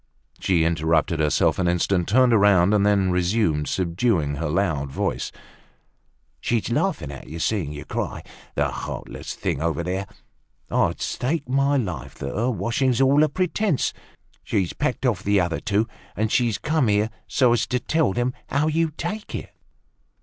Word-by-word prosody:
She 85 Hz, -4 st, +2 dB
interrupted 80 Hz, 0 st, +1 dB
herself 75 Hz, +2 st, +2 dB
an 90 Hz, -, +1 dB
instant, 90 Hz, +1 st, +1 dB
turned 125 Hz, +2 st, +5 dB
round, 100 Hz, -1 st, +5 dB
and 105 Hz, -1 st, +3 dB
then 100 Hz, -2 st, +3 dB
resumed, 90 Hz, -4 st, +1 dB
subduing 85 Hz, -, 0 dB
her 80 Hz, +1 st, -2 dB
loud 75 Hz, -6 st, 0 dB
voice: -, -, -2 dB, 1.1 s
"She's 115 Hz, -1 st, -1 dB
laughing 135 Hz, -, 0 dB
at 65 Hz, -, -10 dB
seeing 85 Hz, -5 st, 0 dB
you 75 Hz, 0 st, -7 dB
cry, -, -, -4 dB, 0.3 s
that -, -, +1 dB
heartless -, -, -6 dB
thing 70 Hz, -, -2 dB
over 85 Hz, -1 st, -1 dB
there. 95 Hz, +3 st, -2 dB, 0.6 s
I'd -, -, +1 dB
stake 140 Hz, +2 st, -2 dB
my 140 Hz, +2 st, +2 dB
life 95 Hz, -10 st, -4 dB
that 70 Hz, -, -5 dB
her 115 Hz, +5 st, +1 dB
washing's 125 Hz, +1 st, 0 dB
all 135 Hz, +2 st, +5 dB
a 155 Hz, -, +4 dB
pretence. 185 Hz, -2 st, 0 dB, 0.5 s
She's 95 Hz, -4 st, -1 dB
packed 145 Hz, -2 st, -2 dB
off 115 Hz, -8 st, +1 dB
the 100 Hz, 0 st, +2 dB
other 85 Hz, -2 st, 0 dB
two, 110 Hz, +1 st, 0 dB, 0.3 s
and 110 Hz, +1 st, 0 dB
she's 120 Hz, -4 st, +2 dB
come 155 Hz, -4 st, +1 dB
here 105 Hz, +1 st, +2 dB, 0.2 s
so 120 Hz, +2 st, +3 dB
as 120 Hz, -, +1 dB
to 125 Hz, -, 0 dB
tell 160 Hz, -2 st, +1 dB
them 120 Hz, +4 st, -1 dB, 0.2 s
how 140 Hz, +3 st, +1 dB
you 165 Hz, +1 st, +1 dB
take 210 Hz, +5 st, -4 dB
it." -, -, -7 dB
105 Hz, 160 wpm, -23 LUFS, 85-130 Hz, 1.1 s, turned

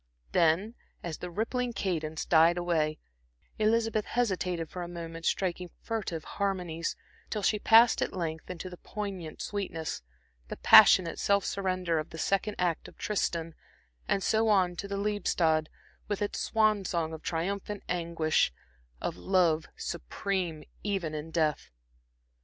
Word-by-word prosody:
Then, 170 Hz, +7 st, +3 dB, 0.3 s
as 165 Hz, -2 st, -5 dB
the 180 Hz, -, -5 dB
rippling 240 Hz, +6 st, -2 dB
cadence 160 Hz, -7 st, -2 dB
died 165 Hz, +1 st, +5 dB
away, 160 Hz, -3 st, 0 dB, 0.6 s
Elizabeth 220 Hz, 0 st, +2 dB
hesitated 185 Hz, -8 st, -1 dB
for 180 Hz, -, -7 dB
a 175 Hz, -, -4 dB
moment, 165 Hz, -1 st, -6 dB
striking 180 Hz, -1 st, -1 dB
furtive 205 Hz, -8 st, -3 dB
harmonies, 180 Hz, -5 st, -2 dB, 0.3 s
till 210 Hz, -2 st, -3 dB
she 210 Hz, +2 st, +2 dB
passed 225 Hz, +3 st, +6 dB
at -, -, 0 dB
length 160 Hz, -3 st, -4 dB
into 180 Hz, 0 st, -6 dB
the 180 Hz, -1 st, -9 dB
poignant 195 Hz, -7 st, -6 dB
sweetness, 185 Hz, -6 st, -4 dB, 0.5 s
the -, -, -6 dB
passionate 170 Hz, -3 st, +7 dB
self 200 Hz, -1 st, +2 dB
surrender 185 Hz, -4 st, 0 dB
of 155 Hz, -, -5 dB
the 165 Hz, -, -9 dB
second 195 Hz, +5 st, 0 dB
act 175 Hz, -3 st, 0 dB
of -, -, -15 dB
Tristan, 170 Hz, -5 st, -1 dB, 0.5 s
and 195 Hz, -, +1 dB
so 220 Hz, +1 st, +2 dB
on 185 Hz, -4 st, +3 dB
to 200 Hz, -, -4 dB
the 200 Hz, 0 st, -3 dB
Liebestod, 175 Hz, -6 st, +1 dB, 0.4 s
with 205 Hz, -1 st, -2 dB
its 205 Hz, -1 st, -2 dB
swan 215 Hz, -2 st, +2 dB
song 165 Hz, -3 st, -2 dB
of 160 Hz, -, -7 dB
triumphant 195 Hz, +4 st, -3 dB
anguish, 165 Hz, -, +1 dB, 0.5 s
of -, -, -3 dB
love 170 Hz, -4 st, +2 dB
supreme 170 Hz, -, -3 dB, 0.2 s
even 195 Hz, -6 st, -2 dB
in 155 Hz, +1 st, -5 dB
death. 155 Hz, -3 st, 0 dB
180 Hz, 140 wpm, -29 LUFS, 165-200 Hz, 0.6 s, passionate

